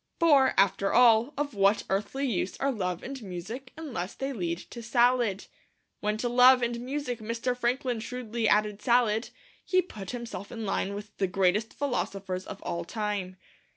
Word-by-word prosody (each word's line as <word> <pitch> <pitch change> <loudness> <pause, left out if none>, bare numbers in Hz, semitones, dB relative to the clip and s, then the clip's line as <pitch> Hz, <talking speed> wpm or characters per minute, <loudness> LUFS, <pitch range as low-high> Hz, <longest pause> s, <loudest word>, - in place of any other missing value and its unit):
For, 285 -6 +5
after 195 0 +3
all, 235 +1 +5
of 290 -1 -2
what 200 +1 +3
earthly 210 +8 -1
use 200 -6 -1
are 275 0 0
Love 180 -6 -3
and 270 0 -6
Music 215 +7 -7
unless 250 - -5
they 270 +1 -3
lead 170 -7 -2
to 235 - -7
Salad? 235 -3 +2 0.5
When 210 +1 -1
to 240 - -1
Love 250 +1 +6
and 235 0 -1
Music 255 -1 -3
Mr. 230 +3 -2
Franklin 245 0 -1
shrewdly 230 -1 -2
added 210 -1 +2
Salad, 235 -2 +2 0.3
he 370 - +2
put 215 - -5
himself 235 -4 -6
in 225 -2 -5
line 200 0 -1
with 205 +1 -9
the 195 - +1
greatest 195 +4 +1
philosophers 195 -9 -3
of - - -8
all 170 0 -3
time. 200 -1 -3
230 Hz, 165 wpm, -28 LUFS, 200-250 Hz, 0.5 s, Love